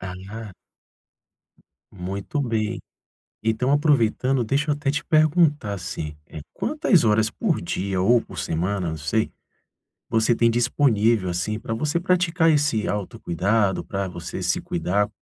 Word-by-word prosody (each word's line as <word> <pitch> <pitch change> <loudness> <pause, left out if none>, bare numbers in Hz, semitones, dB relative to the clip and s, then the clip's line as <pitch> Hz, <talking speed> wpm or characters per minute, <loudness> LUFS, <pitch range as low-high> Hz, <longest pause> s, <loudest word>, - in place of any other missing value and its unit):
Ah. 95 +4 -8 1.4
Muito 100 +8 -4
bem. 115 -3 -1 0.6
Então, 110 +4 0
aproveitando, 135 -3 +2
deixa 140 +6 0
eu - - +3
até 145 -1 -1
te 145 - -2
perguntar, 155 - +3
assim, 75 -5 -5
eh, 75 - -9
quantas 255 - +2
horas 110 0 +3
por 180 - -1
dia 95 +2 -2
ou 115 +6 +4
por - - -11
semana, 90 +2 -1
não 80 - -3
sei, 90 +9 -1 0.8
você 110 +1 +3
tem 115 0 +3
disponível, 115 -4 +2
assim, 95 +5 -2
pra 115 - -4
você 150 +8 0
praticar 175 -2 +2
esse 145 -8 +2
autocuidado, 100 0 0
pra 100 -1 -3
você 85 -2 -6
se - - 0
cuidar, 100 +3 0
110 Hz, 135 wpm, -23 LUFS, 100-145 Hz, 1.4 s, ou